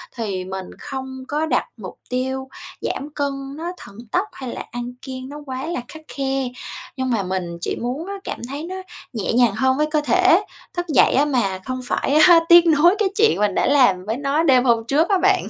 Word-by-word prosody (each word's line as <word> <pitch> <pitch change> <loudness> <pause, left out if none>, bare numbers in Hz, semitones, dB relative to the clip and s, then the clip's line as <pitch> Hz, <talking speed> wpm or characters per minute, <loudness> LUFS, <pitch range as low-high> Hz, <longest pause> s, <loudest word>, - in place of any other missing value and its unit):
thì 200 -6 -3
mình 190 0 -5
không 265 -1 -6
có 300 +3 -1
đặt 315 - +1
mục - - -9
tiêu 265 +1 -2 0.3
giảm 285 - -3
cân 275 -1 -3
nó 340 +2 -4
thần 200 - -13
tốc, 375 +4 +1
hay 260 -2 -7
là - - -5
ăn 245 0 -5
kiêng 260 -1 -7
nó 290 - -8
quá 260 0 -5
là 325 -7 -3
khắt 315 - -11 0.2
khe. 270 -1 0 0.5
Nhưng 260 0 -1
mà 225 -5 +1
mình 180 -2 -3
chỉ - - -2
muốn 260 +8 -4
á 400 - -4
cảm - - -5
thấy 285 +3 -5
nó 365 +3 -6 0.4
nhẹ 220 -3 -2
nhàng 240 -3 +4
hơn 260 +3 +2
với 300 +1 +2
cơ 305 -1 +2
thể. 310 - +4 0.3
Thức 350 0 -2
dậy 305 - +4
á 280 +3 +4
mà 225 -10 0
không 255 0 -3
phải, 270 - -1
a, 345 -2 +8
tiếc 345 0 +9
nuối 330 +4 +5
cái 415 -3 +2
chuyện 440 +1 +4
mình 205 -2 +1
đã - - +2
làm 245 -10 +4
với 220 +3 -2
nó 285 +3 0
đêm 255 -5 +5
hôm 235 -3 +3
trước 305 +6 +2
á 395 - +4
bạn. - - +2
265 Hz, 220 wpm, -21 LUFS, 240-305 Hz, 0.5 s, tiếc